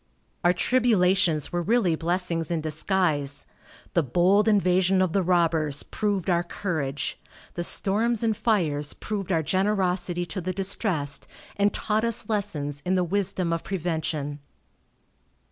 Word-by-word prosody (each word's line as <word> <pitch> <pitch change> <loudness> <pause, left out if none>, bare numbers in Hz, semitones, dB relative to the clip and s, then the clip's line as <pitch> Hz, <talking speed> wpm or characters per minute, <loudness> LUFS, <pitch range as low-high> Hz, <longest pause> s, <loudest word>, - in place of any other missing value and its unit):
Our 175 +1 +5
tribulations 185 - +2
were 175 - -1
really 205 -2 +2
blessings 170 0 -1
in 170 -2 0
disguise. 155 -3 -1 0.5
The 170 - +4
bold 180 - +3
invasion 190 -2 +3
of 185 -3 +1
the 195 - +3
robbers 165 -5 +1
proved 205 -4 -2
our 170 -2 +3
courage; 160 -6 -3 0.3
the 175 - -3
storms 220 +6 +1
and 220 -1 +2
fires 155 -11 0
proved 200 -3 -4
our 165 -3 +2
generosity 185 -1 0
to 175 +3 -5
the 185 +2 -3
distressed, 185 -6 -2 0.3
and 200 0 +2
taught 215 +1 -1
us 230 -1 -1
lessons 150 -10 -2
in 185 +1 +1
the 180 - +2
wisdom 180 -1 0
of 165 - -2
prevention. 160 -5 -3
180 Hz, 135 wpm, -26 LUFS, 160-200 Hz, 0.5 s, Our